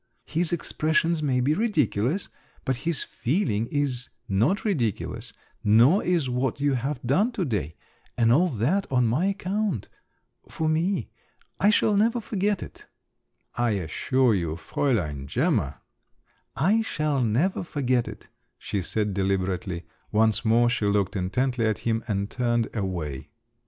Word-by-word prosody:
"His 165 +1 0
expressions 160 0 0
may 130 -4 +1
be 140 +4 +2
ridiculous, 155 - 0 0.4
but 130 -2 0
his 165 +4 0
feeling 115 - -1
is 130 -3 -1 0.2
not 115 - +1
ridiculous, 125 - -1 0.3
nor 120 - +5
is 170 -6 +1
what 125 +1 -1
you 145 0 +2
have 130 +2 -2
done 185 - +2
to 185 - -1
day. 100 - -2 0.4
And 115 -1 +4
all 165 +9 +5
that 150 - 0
on 125 -2 +3
my 125 +11 +1
account… 200 - -1 0.6
for 160 - -2
me… 165 +5 0 0.5
I 205 - +5
shall 210 0 +3
never 230 +4 +3
forget 205 -3 -1
it." - - -13 0.7
"I 120 -2 +1
assure 120 +8 +1
you, 85 -5 -1
Fräulein 85 - -1
Gemma - - 0 0.4
…" - - -41 0.2
"I 225 +1 +4
shall 150 -10 -1
never 125 - +1
forget 130 -7 0
it," - - -9 0.3
she 100 - -3
said 105 +3 -1
deliberately; 95 -2 -1 0.3
once 110 0 +3
more 120 +1 +4
she 120 -4 0
looked 100 -2 +1
intently 120 +5 0
at 110 - 0
him, 115 -1 0
and 100 -2 -1
turned 120 -1 0
away. 85 -10 -3
125 Hz, 140 wpm, -26 LUFS, 105-165 Hz, 0.7 s, nor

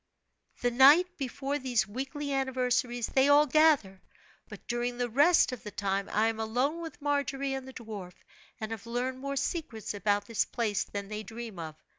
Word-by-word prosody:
"The 245 - +2
night 275 +8 +7
before 275 +2 -3
these 245 -5 0
weekly 275 +6 -4
anniversaries 250 -3 0
they 270 +1 +3
all 290 +1 +7
gather; 290 -11 +3 0.5
but - - -11
during 240 0 -2
the 245 -1 -2
rest 290 +5 +5
of 250 -3 -6
the 220 - -7
time 195 0 -2
I 215 +2 +2
am 225 -1 -2
alone 250 +9 -1
with 325 -3 -9
Margery 275 -1 -1
and 265 -1 -5
the 265 - -10
dwarf, 210 -7 -8 0.5
and 220 0 -5
have 225 0 -6
learned 250 +2 -2
more 275 +1 -4
secrets 270 - -3
about 205 0 0
this 230 -2 0
place 215 -4 -1
than 200 -1 -6
they 215 0 -4
dream 225 -2 -8
of. 160 -2 -6
245 Hz, 180 wpm, -29 LUFS, 220-275 Hz, 0.5 s, night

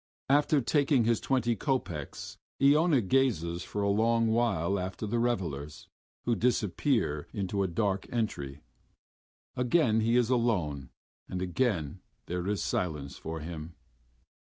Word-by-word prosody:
After 145 +1 +4
taking 140 0 +2
his 115 0 +2
twenty 120 -3 +1
kopecks, 100 - -3 0.2
Iona 145 +1 +5
gazes 95 -7 +1
for 105 - -3
a 100 - +2
long 115 +2 +2
while 100 -5 +1
after 95 +4 -4
the 115 +3 -1
revelers, 85 - -2 0.4
who 120 - +2
disappear 110 - 0
into 100 0 -2
a 95 - +1
dark 95 +2 -1
entry. 75 - -3 0.9
Again 125 -2 +3
he 115 +2 +2
is 125 0 +3
alone 90 - 0 0.4
and 90 - -3
again 90 - -1 0.3
there 90 +1 -3
is 105 -1 -1
silence 75 -6 -2
for 80 0 -5
him.... 80 +1 -7
105 Hz, 130 wpm, -30 LUFS, 85-120 Hz, 0.9 s, Iona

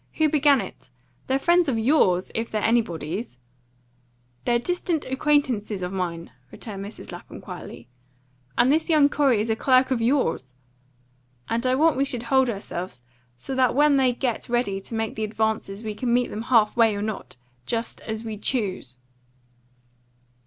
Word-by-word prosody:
Who 315 -1 +2
began 290 -2 +4
it? - - -10 0.4
They're 265 - +2
friends 345 +2 +3
of 240 - 0
yours 220 - +2
if 230 +1 -2
they're 215 -1 -2
anybody's." 195 - -1 1.1
"They're 240 -1 +3
distant 345 +3 -2
acquaintances 260 -8 0
of 180 +1 -4
mine," 170 -5 -4 0.2
returned 195 - -7
Mrs. 205 +2 -9
Lapham - - -10
quietly; 115 - -9 0.7
"and 245 +3 +4
this 320 +3 +1
young 300 -3 +5
Corey 275 -7 +2
is 220 +1 -1
a - - +2
clerk 255 +2 +3
of 245 -3 +1
yours. 225 - 0 0.9
And 235 +3 0
I 255 - +3
want 315 +1 +3
we 275 - +2
should 245 -4 -2
hold 265 +1 +3
ourselves 185 - -5 0.3
so 265 - -6
that 260 -1 +2
when 290 0 +5
they 260 -2 +4
get 245 -2 -3
ready 235 -5 0
to 225 - -7
make 225 0 -2
the 220 - -4
advances 215 -1 -2
we 215 -1 -3
can 240 +3 -2
meet 245 0 +2
them 215 - -4
half 225 -4 +4
way 225 -3 +4
or 205 - -3
not, 215 -10 -5 0.3
just 230 0 -3
as 220 0 -5
we 220 -2 -5
choose." 190 - -2
235 Hz, 165 wpm, -24 LUFS, 210-265 Hz, 1.1 s, young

